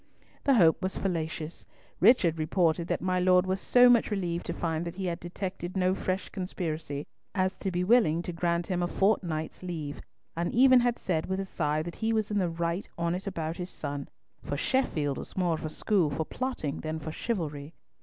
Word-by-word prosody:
The 275 -2 +5
hope 170 -6 +5
was 185 0 -2
fallacious; 160 -3 -3 0.4
Richard 180 -6 +5
reported 165 +1 +1
that - - -1
my 185 0 +1
Lord 180 0 +4
was 190 +1 -1
so 245 0 +6
much 240 -2 +5
relieved 175 -5 -2
to - - -1
find 165 -1 -2
that 170 0 -5
he 190 0 -4
had 170 -2 -2
detected 185 +1 -5
no 185 0 +3
fresh 185 0 -2
conspiracy, 160 -6 -4 0.3
as 185 0 +1
to 195 - -1
be 180 0 -1
willing 180 -6 +4
to 175 - -5
grant 170 0 0
him 180 -1 -1
a 175 - +1
fortnight's 175 -6 0
leave, 160 -5 -5 0.3
and 170 +1 -1
even 255 +1 +7
had 245 -1 +1
said 160 -4 -1
with 190 0 -1
a 195 - -2
sigh 155 -4 -1
that 170 +1 -7
he 225 0 0
was 215 -1 0
in 205 - +1
the 180 -3 +1
right 170 +3 -2
on't 175 +3 -1
about 165 -4 -3
his 180 0 -5
son, 145 -4 -5 0.3
for 145 - -3
Sheffield 150 - 0
was - - -9
more 175 -2 +2
of 160 - -4
a 155 - -2
school 180 0 +1
for 155 +2 -2
plotting 250 - -3
than 155 0 -3
for 155 0 -5
chivalry. 155 -7 -3
175 Hz, 205 wpm, -29 LUFS, 160-195 Hz, 0.4 s, even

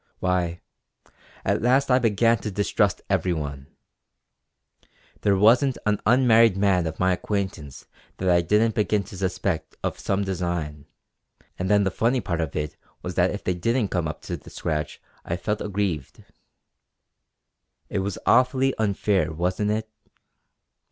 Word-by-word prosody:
Why, 90 -2 -1 0.8
at - - +1
last 130 +3 +3
I 125 - +5
began 115 0 +3
to 105 - -4
distrust 100 0 0
everyone. 80 -7 -2 1.5
There 100 -1 +3
wasn't 120 +6 +4
an 105 -1 +1
unmarried 115 -4 +5
man 95 -4 +2
of 80 - -6
my 95 0 +3
acquaintance 90 -7 -4 0.3
that 95 - -3
I 85 -1 +4
didn't 105 +6 +2
begin 105 -1 +1
to 95 0 -11
suspect 95 -1 -2
of - - -2
some 100 +1 0
design; 85 -6 -3 0.7
and 95 +1 -2
then 105 -1 +4
the 95 - 0
funny 120 +6 +1
part 85 -6 -2
of 80 -3 -4
it 75 0 -3 0.3
was 90 - -4
that 90 +1 +3
if 100 - -5
they 90 - 0
didn't 115 +5 0
come 85 -3 -1
up 75 - -7
to - - -4
the - - -14
scratch 75 -1 -3 0.2
I 85 - -3
felt 105 +3 -2
aggrieved. 95 -9 -3 1.6
It 100 - -2
was 95 -1 -3
awfully 130 +1 +3
unfair 100 -5 +1
wasn't 90 +6 -1
it? 110 +1 -1
95 Hz, 145 wpm, -24 LUFS, 85-110 Hz, 1.6 s, I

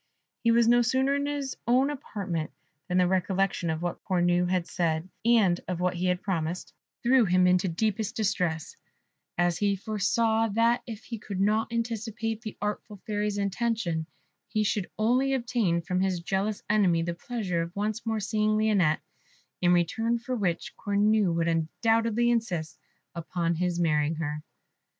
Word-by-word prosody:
He 230 - +3
was 230 0 +4
no 240 +1 +5
sooner 260 +3 +2
in 285 0 0
his 285 -2 -3
own 260 +4 +3
apartment 195 - -4 0.4
than 180 - 0
the 180 - +5
recollection 190 -1 0
of 160 +1 -2
what 175 - -3
Cornue 175 -1 +2
had 180 -2 +1
said, 165 -1 -1 0.2
and 215 -7 +4
of 180 -2 -3
what 180 0 +1
he 180 +1 -1
had 180 0 0
promised, 175 -3 -3 0.3
threw 250 +1 +5
him 185 -2 +3
into 180 +1 +3
deep 200 +4 0
distress, 195 -7 -1 0.6
as 175 -1 +1
he 200 -1 +2
foresaw 220 +3 +1
that 230 +1 +3
if 220 -2 -7
he 230 -2 -6
could 200 -2 -5
not 215 +3 +1
anticipate 225 -1 -3
the 215 -3 -7
artful 210 0 -4
Fairy's 210 -1 -1
intention, 200 -5 -1 0.4
he 215 -1 0
should 205 -2 -1
only 255 +5 +2
obtain 235 -9 0
from 180 +2 -1
this 190 -2 0
jealous 195 +4 -2
enemy 190 -6 +3
the 170 0 -2
pleasure 185 -3 -3
of 170 +1 -6
once 215 +3 -2
more 225 -1 -1
seeing 215 +1 +1
Lionette, 200 -8 +2 0.6
in 175 -1 +4
return 225 +7 +2
for 245 +2 -4
which 180 -7 -2
Cornue 205 -1 +2
would 165 0 0
undoubtedly 225 +8 +1
insist 180 -10 -2 0.3
upon 170 0 -2
his 175 +1 -1
marrying 155 -2 +2
her. 150 -1 -3
200 Hz, 160 wpm, -28 LUFS, 175-225 Hz, 0.6 s, no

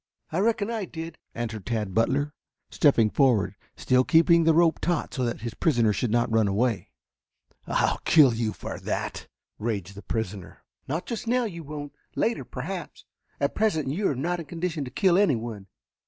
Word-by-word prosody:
"I 165 - 0
reckon 215 +1 +1
I 220 -4 -2
did," 165 -1 -8 0.2
answered 115 -4 -4
Tad 110 -5 -2
Butler, 140 +7 +1 0.4
stepping 115 -8 +4
forward, 110 -9 +3 0.2
still 130 0 +3
keeping 165 +3 +5
the 165 - +5
rope 165 -1 +4
taut 175 -2 -1
so 130 - -1
that 120 -2 -2
his 115 -1 -4
prisoner 120 -9 +2
should 120 - -1
not 120 +1 +1
run 110 -2 +4
away. 110 - 0 0.8
"I'll - - +1
kill 145 -6 +6
you 115 -1 -1
for - - -7
that!" - - -4 0.3
raged 100 -4 -3
the 100 - -10
prisoner. 105 -5 -5 0.2
"Not 155 +6 -2
just 230 -1 -5
now 250 +2 +2
you 175 -7 -5
won't. 145 -1 -7 0.2
Later, 230 +1 0
perhaps. - - -6 0.3
At - - 0
present 160 -11 +1
you 190 +9 0
are 140 - -1
not 175 +7 -1
in 165 - -7
condition 165 -1 -3
to - - -6
kill 185 +7 +3
anyone. 115 - 0
140 Hz, 175 wpm, -26 LUFS, 115-170 Hz, 0.8 s, kill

